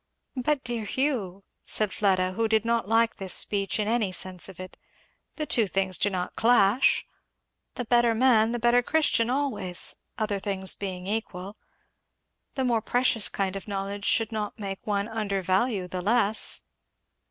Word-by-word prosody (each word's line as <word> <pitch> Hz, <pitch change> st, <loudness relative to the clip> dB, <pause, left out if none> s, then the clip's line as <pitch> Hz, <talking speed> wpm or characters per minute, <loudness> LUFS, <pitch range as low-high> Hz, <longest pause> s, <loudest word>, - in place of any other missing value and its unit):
"But 270 Hz, +2 st, -1 dB
dear 235 Hz, -3 st, -3 dB
Hugh," 210 Hz, -6 st, -2 dB, 0.2 s
said 210 Hz, -3 st, -1 dB
Fleda, 185 Hz, -2 st, +1 dB
who 225 Hz, +4 st, -1 dB
did 220 Hz, 0 st, +1 dB
not 230 Hz, -3 st, 0 dB
like 225 Hz, 0 st, +2 dB
this 190 Hz, -2 st, +2 dB
speech 200 Hz, 0 st, +2 dB
in 210 Hz, -, -1 dB
any 220 Hz, -4 st, 0 dB
sense 185 Hz, 0 st, -1 dB
of 190 Hz, -, -13 dB
it, 185 Hz, 0 st, -9 dB, 0.6 s
"the 305 Hz, -, -3 dB
two 230 Hz, -7 st, +2 dB
things 190 Hz, -1 st, -1 dB
do 205 Hz, -, +2 dB
not 180 Hz, -2 st, -4 dB
clash. 230 Hz, 0 st, +3 dB, 0.7 s
The 245 Hz, -, -4 dB
better 240 Hz, 0 st, +3 dB
man 225 Hz, -2 st, +3 dB
the 240 Hz, -, -2 dB
better 240 Hz, +1 st, +3 dB
Christian 245 Hz, -4 st, +1 dB
always, 255 Hz, -10 st, 0 dB, 0.2 s
other 215 Hz, -2 st, -2 dB
things 190 Hz, -2 st, +1 dB
being 185 Hz, -2 st, -6 dB
equal. 200 Hz, -2 st, -4 dB, 1.0 s
The 265 Hz, -1 st, -1 dB
more 235 Hz, -3 st, +1 dB
precious 245 Hz, -1 st, +2 dB
kind 195 Hz, -1 st, -2 dB
of 195 Hz, -, -7 dB
knowledge 200 Hz, 0 st, -4 dB
should 225 Hz, 0 st, +2 dB
not 210 Hz, -2 st, -4 dB
make 195 Hz, -2 st, -7 dB
one 200 Hz, -1 st, -1 dB
undervalue 200 Hz, -1 st, -1 dB
the 180 Hz, 0 st, -5 dB
less?" 220 Hz, +1 st, +2 dB
210 Hz, 160 wpm, -26 LUFS, 195-235 Hz, 1.0 s, clash